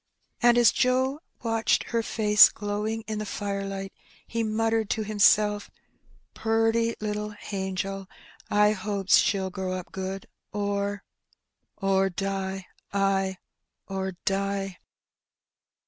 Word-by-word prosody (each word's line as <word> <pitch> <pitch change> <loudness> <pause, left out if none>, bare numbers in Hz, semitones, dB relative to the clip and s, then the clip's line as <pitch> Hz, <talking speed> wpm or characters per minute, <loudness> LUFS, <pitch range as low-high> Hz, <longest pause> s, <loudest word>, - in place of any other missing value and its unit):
And 240 0 +5
as 240 -2 +6
Joe 260 +2 +1 0.2
watched 225 -1 +1
her 230 -1 +2
face 210 -2 +6
glow 205 0 -3
ing 225 0 -3
in 215 -1 -3
the - - -2
firelight 195 -1 -4 0.3
he 230 - -2
muttered 225 0 0
to 220 - 0
himself, 210 0 +3 0.6
"Purty 225 +1 +1
little 210 0 -3
hangel; 195 0 -4 0.4
I 210 0 +4
hopes 200 -1 +2
she'U 190 -2 +1
grow 185 -1 -3
up 185 -1 -6
good, 190 0 -5 0.3
or 200 0 -2 0.4
— - - -54
or 195 0 +2
die 195 0 -3 0.2
— - - -42
ay, 195 -1 +1 0.5
or 190 -1 -3
die!'' 195 -2 -1
205 Hz, 120 wpm, -27 LUFS, 195-220 Hz, 0.6 s, as